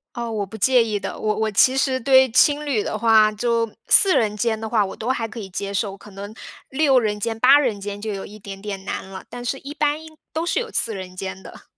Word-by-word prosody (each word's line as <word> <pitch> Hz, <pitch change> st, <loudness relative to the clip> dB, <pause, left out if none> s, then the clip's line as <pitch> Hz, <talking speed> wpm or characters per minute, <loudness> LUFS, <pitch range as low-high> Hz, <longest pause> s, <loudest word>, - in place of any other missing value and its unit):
哦， 235 Hz, -1 st, -4 dB
我 210 Hz, -2 st, -2 dB
不 195 Hz, -, -12 dB
介 250 Hz, +3 st, +4 dB
意 215 Hz, -2 st, -2 dB
的， -, -, -6 dB
我 215 Hz, 0 st, 0 dB
我 220 Hz, 0 st, 0 dB
其 255 Hz, +6 st, +4 dB
实 265 Hz, -1 st, +1 dB
对 260 Hz, +1 st, +5 dB
青 290 Hz, +4 st, +4 dB
旅 265 Hz, -8 st, 0 dB
的 -, -, -3 dB
话， 215 Hz, -1 st, +4 dB
就 230 Hz, +1 st, 0 dB, 0.2 s
4 390 Hz, -2 st, +6 dB
人 210 Hz, -2 st, +1 dB
间 220 Hz, -1 st, 0 dB
的 220 Hz, -, -5 dB
话， 215 Hz, -3 st, +2 dB
我 190 Hz, -, -7 dB
都 235 Hz, -, -5 dB
还 235 Hz, -3 st, -1 dB
可 225 Hz, +1 st, -9 dB
以 195 Hz, -3 st, -7 dB
接 195 Hz, +2 st, -5 dB
受， 195 Hz, 0 st, -2 dB
可 210 Hz, -, -15 dB
能 200 Hz, +2 st, -8 dB, 0.4 s
6 270 Hz, -1 st, +3 dB
人 210 Hz, -3 st, -2 dB
间、 225 Hz, +1 st, -2 dB
8 270 Hz, +4 st, +7 dB
人 225 Hz, -8 st, -1 dB
间 205 Hz, 0 st, -5 dB
就 215 Hz, 0 st, -4 dB
有 195 Hz, -, -5 dB
一 210 Hz, +1 st, -11 dB
点 195 Hz, -1 st, -10 dB
点 195 Hz, -2 st, -6 dB
难 -, -, -4 dB
了， 190 Hz, -1 st, -9 dB
但 245 Hz, 0 st, -8 dB
是 270 Hz, -, -2 dB
一 280 Hz, +2 st, -8 dB
般 295 Hz, -1 st, 0 dB, 0.3 s
都 320 Hz, +2 st, -2 dB
是 345 Hz, -, 0 dB
有 465 Hz, -, -4 dB
4 225 Hz, -, 0 dB
人 185 Hz, -1 st, -8 dB
间 190 Hz, 0 st, -6 dB
的。 -, -, -13 dB
220 Hz, 255 characters per minute, -22 LUFS, 205-260 Hz, 0.4 s, 8